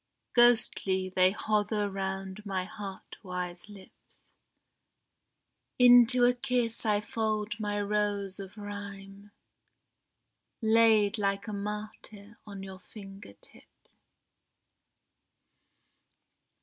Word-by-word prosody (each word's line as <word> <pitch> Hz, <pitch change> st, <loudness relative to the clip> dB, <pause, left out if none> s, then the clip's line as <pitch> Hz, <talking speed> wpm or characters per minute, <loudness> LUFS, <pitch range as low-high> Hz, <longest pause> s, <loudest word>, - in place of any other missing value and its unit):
Ghostly 195 Hz, -6 st, +3 dB
they 185 Hz, 0 st, +5 dB
hover 210 Hz, +1 st, 0 dB
round 195 Hz, 0 st, -5 dB
my 190 Hz, -3 st, -3 dB
heart 200 Hz, -1 st, -9 dB
wise 180 Hz, -1 st, -6 dB
lips; 200 Hz, -2 st, -17 dB, 1.5 s
Into 245 Hz, 0 st, +6 dB
a 245 Hz, 0 st, +5 dB
kiss 245 Hz, -3 st, -2 dB
I 210 Hz, -1 st, +2 dB
fold 215 Hz, 0 st, -2 dB
my 205 Hz, -1 st, -2 dB
rose 205 Hz, -1 st, -1 dB
of 195 Hz, +1 st, -9 dB
Rhyme, 200 Hz, -1 st, -9 dB, 1.3 s
Laid 220 Hz, -2 st, +4 dB
like 200 Hz, +1 st, -1 dB
a 215 Hz, -, -5 dB
martyr 210 Hz, +1 st, -7 dB
on 200 Hz, -2 st, -8 dB
your 190 Hz, -1 st, -9 dB
finger 195 Hz, -, -12 dB
tips. -, -, -21 dB
205 Hz, 90 wpm, -29 LUFS, 195-215 Hz, 1.5 s, Into